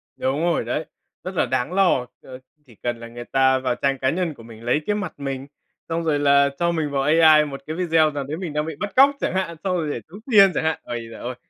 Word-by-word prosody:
Đúng 135 +3 -1
rồi 170 -5 +1
đấy. 135 +7 -2 0.4
Rất 185 +1 -6
là 160 - +2
đáng 130 +6 -2
lo, 185 -10 +3 0.2
ờ, 130 -1 -11 0.3
chỉ 120 -5 -19
cần 120 +2 -4
là 115 - -8
người 120 +1 -9
ta 130 0 +3
vào 130 -2 -1
trang 135 +1 -1
cá 130 - +1
nhân 175 0 -1
của 115 -5 -15
mình 115 -1 -13
lấy 125 +6 +1
cái 210 - +1
mặt 205 -3 -4
mình, 135 -1 -4 0.4
xong 165 +1 -1
rồi 155 -3 +1
là 140 0 +4
cho 170 0 +2
mình 160 -3 -1
vào 140 -1 0
AI 155 0 +6
một 135 -2 -7
cái 155 - -4
video 165 -3 +2
nào 145 -1 -4
đấy 145 +4 -5
mình 175 -4 -5
đang 150 0 -1
bị 160 -1 -5
bắt 205 -1 -4
cóc 275 +2 +7
chẳng - - -1
hạn, 185 -3 -2
xong 185 -2 0
rồi 160 -3 -2
để 120 - -4
tống 195 +5 -12
tiền 200 -3 +7
chẳng - - 0
hạn. 160 0 0
Ôi 120 -1 -6
giời 115 - -10
ơi! 125 +1 -5
150 Hz, 270 wpm, -22 LUFS, 130-170 Hz, 0.4 s, cóc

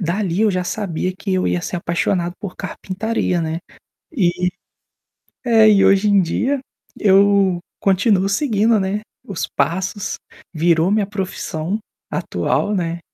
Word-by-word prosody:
dali 185 +2 0
eu 215 - +4
já 185 -1 -1
sabia 185 -3 -2
que 195 -1 -2
eu 185 - +1
ia 175 - 0
ser 175 - -4
apaixonado 170 +1 -1
por 195 -3 -7
carpintaria, 190 -2 -2
né. 160 0 -2 0.5
E 180 - +1 1.0
é, 225 -2 +6
e 200 -2 +5
hoje 195 +2 +4
em 200 -1 +5
dia 260 +11 0 0.4
eu 195 -2 +4 0.2
continuo 195 0 +2
seguindo, 220 -1 +2
né, 195 +2 -1 0.3
os 195 -4 -3
passos. 190 +4 -1 0.4
Virou 165 +1 +2
minha 210 -1 +2
profissão 190 -2 -3 0.3
atual, 210 - -1
né. 170 -2 -2
190 Hz, 130 wpm, -19 LUFS, 175-205 Hz, 1.0 s, é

